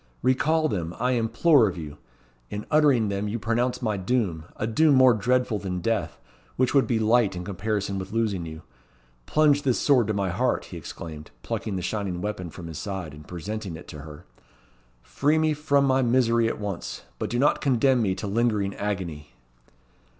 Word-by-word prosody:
"Recall 155 +5 +2
them, 85 - -3
I 125 - +1
implore' 125 +2 +4
of 90 -2 -4
you. 75 -3 -8 0.5
In 105 +1 -5
uttering 140 -8 +4
them 100 +1 -2
you 105 +3 -2
pronounce 120 +3 -1
my 110 -3 0
doom 95 -6 -1
a - - -2
doom 145 +6 +4
more 130 -1 +7
dreadful 125 0 +1
than 90 -2 -3
death, 115 +5 -2 0.4
which 130 0 +1
would 140 -2 +4
be 120 - +1
light 110 -2 +3
in 90 - -5
comparison 100 0 -2
with 95 0 -7
losing 110 -5 0
you. 80 0 -9 0.6
Plunge 150 -2 +4
this 130 -4 +1
sword 130 -7 +3
to 110 - 0
my 100 -2 0
heart," 125 +7 0
he 90 - -9
exclaimed, 80 -1 -8
plucking 105 - -3
the 90 - -3
shining 95 -2 -2
weapon 100 -2 -4
from 85 +1 -10
his 80 -2 -6
side, 95 -7 -5
and 75 0 -13
presenting 95 +1 -5
it 80 - -11
to 75 - -8
her. 75 0 -11 0.8
"Free 150 +3 +1
me 155 -1 +2
from 140 -2 +2
my 135 0 +3
misery 115 -2 +3
at 115 - -3
once, 100 -4 -5 0.2
but - - -2
do 120 - -1
not 140 +4 +2
condemn 130 -2 +3
me 95 -4 +1
to 95 - -5
lingering 105 -2 0
agony." 90 -8 -4
110 Hz, 185 wpm, -25 LUFS, 95-125 Hz, 0.8 s, more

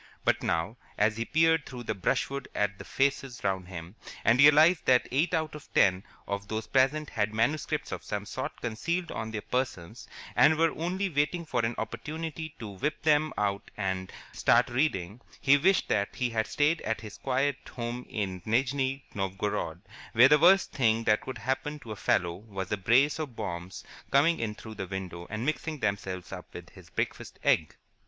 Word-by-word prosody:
But - - +2
now, 85 +8 -1 0.2
as 110 +1 +2
he 115 - -1
peered 160 +1 +3
through 125 -2 -7
the 110 - -2
brushwood 135 +7 -1
at 105 -1 0
the - - -7
faces 135 -2 -1
round 95 -2 -1
him, 85 -1 -8 0.3
and 120 +3 +5
realized 155 +4 +6
that 125 -1 +4
eight 145 +7 +2
out 160 -1 -1
of 150 -2 -11
ten 95 -1 +4 0.2
of 100 0 -3
those 110 0 -3
present 135 +3 +2
had 105 0 -1
manuscripts 125 +8 0
of - - -5
some - - -4
sort - - -5
concealed 170 +10 -2
on 110 - -4
their 110 -2 -5
persons, 120 -5 -3 0.3
and 155 +1 +6
were 165 0 +3
only 185 +4 -2
waiting 165 +1 0
for 125 -7 -1
an 115 +1 0
opportunity 155 +6 -5
to 110 - -7
whip 125 +12 -3
them 155 0 +3
out 100 -1 -1
and 95 -2 -2 0.2
start 120 +1 +3
reading, 120 - -1 0.2
he 140 0 +5
wished 185 +7 +3
that 100 - 0
he 125 -2 -1
had 110 -1 0
stayed 150 +3 +1
at 110 - -2
his 105 -2 -10
quiet 135 +1 0 0.2
home 120 0 -4
in 95 -4 -3
Nijni 135 +4 0
Novgorod, 95 +1 -2 0.3
where 125 +4 +7
the 150 +1 +6
worst 190 +5 +5
thing 115 -4 +2
that 105 -1 +3
could 130 - -6
happen 135 +4 -2
to 125 -6 -10
a - - -4
fellow 90 -3 +1
was 95 -3 -7
a - - +3
brace 130 +10 +3
of 145 -7 -5
bombs 85 -1 -5 0.3
coming 155 +5 +4
in 110 -2 -2
through 110 +1 -9
the 95 -3 -5
window 90 -2 -6
and 110 +3 -3
mixing 155 +1 -2
themselves 95 -5 -2
up - - -8
with - - -9
his - - -15
breakfast - - -4
egg. 80 - +2
120 Hz, 185 wpm, -29 LUFS, 105-150 Hz, 0.3 s, where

